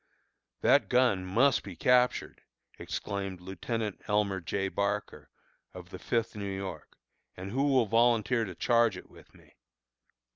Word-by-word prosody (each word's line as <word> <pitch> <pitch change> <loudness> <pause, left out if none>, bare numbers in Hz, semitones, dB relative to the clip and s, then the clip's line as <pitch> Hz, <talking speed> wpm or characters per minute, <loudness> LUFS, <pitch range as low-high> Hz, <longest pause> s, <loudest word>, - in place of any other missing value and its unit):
"That - - +4
gun 125 -7 +3
must 130 +9 +3
be 95 -3 -9
captured," 125 +7 +2 0.4
exclaimed 95 -2 -4
Lieutenant 100 +4 -4
Elmer 105 -2 +1
J. 95 +3 -2
Barker, 100 -7 -3 0.5
of - - -10
the - - -8
Fifth 115 -2 -1
New 100 -1 -4
York, 95 -5 -7 0.4
"and 95 +2 -7
who 135 +4 +1
will 130 -4 +3
volunteer 115 +1 +2
to 95 -4 -8
charge 115 -3 +2
it - - -13
with - - -18
me?" - - -22
105 Hz, 140 wpm, -29 LUFS, 95-120 Hz, 0.5 s, That